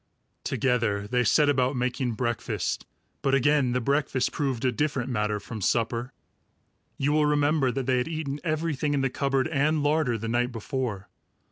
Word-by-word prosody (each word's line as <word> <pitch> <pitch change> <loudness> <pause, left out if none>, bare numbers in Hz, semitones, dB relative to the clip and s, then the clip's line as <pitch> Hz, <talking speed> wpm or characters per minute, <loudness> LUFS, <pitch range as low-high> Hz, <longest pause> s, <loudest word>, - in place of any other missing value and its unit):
Together 115 -6 0
they 125 +3 +1
set 145 +6 +4
about 130 -1 +2
making 125 0 -1
breakfast; 120 0 -2 0.3
but 135 -1 +2
again 135 -1 +3
the 125 - +1
breakfast 135 0 0
proved 135 -4 -2
a 130 - +3
different 135 -1 -1
matter 105 -2 0
from 110 +1 -7
supper. 115 +4 0 0.9
You 140 +2 +1
will 150 0 +3
remember 145 -2 +2
that 135 0 -3
they 130 0 +2
had 125 - -1
eaten 155 -3 -3
everything 155 -3 -1
in 140 - +1
the 135 -1 0
cupboard 135 0 0
and 150 0 +1
larder 145 -5 +2
the 115 +1 -5
night 120 +2 0
before. 115 -3 -4
130 Hz, 165 wpm, -26 LUFS, 120-145 Hz, 0.9 s, set